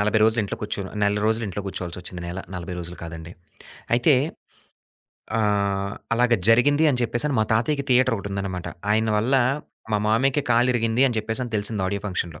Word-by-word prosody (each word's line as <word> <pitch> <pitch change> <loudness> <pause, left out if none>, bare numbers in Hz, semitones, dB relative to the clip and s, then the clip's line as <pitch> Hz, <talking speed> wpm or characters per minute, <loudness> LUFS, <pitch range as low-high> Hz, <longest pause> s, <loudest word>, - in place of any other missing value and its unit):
40 105 +1 +2
రోజులు 110 +1 +3
ఇంట్లో 100 - -4
కూర్చొనా 100 -2 -4
నెల 100 0 +2
రోజులు 110 +1 +1
ఇంట్లో 100 +2 -4
కూర్చోవాల్సొచ్చింది. 90 -1 -6
నెల. 90 - -5 0.2
40 90 0 -5
రోజులు 85 +1 -8
కాదండి. 85 +1 -8 0.6
అయితే 135 +5 +4 1.3
ఆహ్, 100 -2 0 0.2
అలాగా 120 0 +3
జరిగింది 145 +7 +5
అని 130 -4 +1
చెప్పేసి 120 +5 0
మా 110 - +3
తాతయ్యకి 140 +6 +1
థియేటరోకటుందనమాట. 100 -7 0 0.2
ఆయన 110 +1 +2
వల్ల 120 +6 +1 0.6
మా 105 - +3
మామయ్యకి 135 +6 +2
కాలిరిగింది 120 0 +3
అని 120 -3 -1
చెప్పేసని 115 +2 -3
తెలిసింది 105 -1 -1
ఆడియో 100 +1 -2
ఫంక్షన్‌లో. 85 -5 -4
110 Hz, 150 wpm, -24 LUFS, 100-120 Hz, 1.3 s, జరిగింది